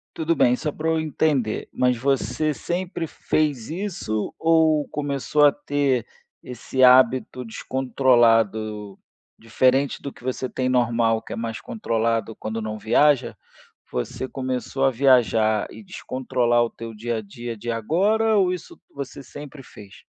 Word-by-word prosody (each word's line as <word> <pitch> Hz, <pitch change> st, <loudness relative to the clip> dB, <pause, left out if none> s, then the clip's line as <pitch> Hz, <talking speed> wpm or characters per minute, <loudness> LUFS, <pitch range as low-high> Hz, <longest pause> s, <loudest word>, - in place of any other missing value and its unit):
Tudo 165 Hz, +1 st, 0 dB
bem. 125 Hz, -3 st, +4 dB
Só 150 Hz, +1 st, -3 dB
pra 160 Hz, +1 st, -2 dB
eu 160 Hz, 0 st, +1 dB
entender, 145 Hz, -7 st, -1 dB
mas 125 Hz, -1 st, +2 dB
você 140 Hz, +4 st, 0 dB
sempre 175 Hz, +2 st, -4 dB
fez 145 Hz, -7 st, -1 dB
isso 170 Hz, -, -3 dB
ou 160 Hz, -2 st, +3 dB
começou 145 Hz, 0 st, +1 dB
a 145 Hz, -, +7 dB
ter 140 Hz, -5 st, 0 dB, 0.4 s
esse 125 Hz, +1 st, -2 dB
hábito 125 Hz, 0 st, +4 dB
descontrolado 115 Hz, -5 st, +1 dB, 0.4 s
diferente 130 Hz, +4 st, +1 dB
do 140 Hz, -, -6 dB
que -, -, -18 dB
você 130 Hz, 0 st, -3 dB
tem 130 Hz, -1 st, -2 dB
normal 115 Hz, -3 st, +2 dB
que -, -, -13 dB
é -, -, -4 dB
mais 115 Hz, -1 st, -5 dB
controlado 115 Hz, -, -1 dB
quando 110 Hz, +1 st, -5 dB
não 110 Hz, 0 st, -4 dB
viaja? 130 Hz, +4 st, +2 dB, 0.6 s
Você 65 Hz, -, -4 dB
começou 130 Hz, +1 st, -3 dB
a 135 Hz, -, +4 dB
viajar 115 Hz, -4 st, +3 dB
e -, -, -11 dB
descontrolar 125 Hz, -8 st, 0 dB
o -, -, -5 dB
teu 115 Hz, -1 st, -9 dB
dia 115 Hz, +2 st, -3 dB
a -, -, -3 dB
dia 115 Hz, +3 st, -7 dB
de 120 Hz, +3 st, -4 dB
agora? 205 Hz, -, +1 dB
Ou 185 Hz, -2 st, +3 dB
isso 180 Hz, -, -9 dB, 0.2 s
você 140 Hz, 0 st, -7 dB
sempre 145 Hz, +1 st, -10 dB
fez? 100 Hz, -4 st, -14 dB
130 Hz, 145 wpm, -23 LUFS, 115-150 Hz, 0.6 s, a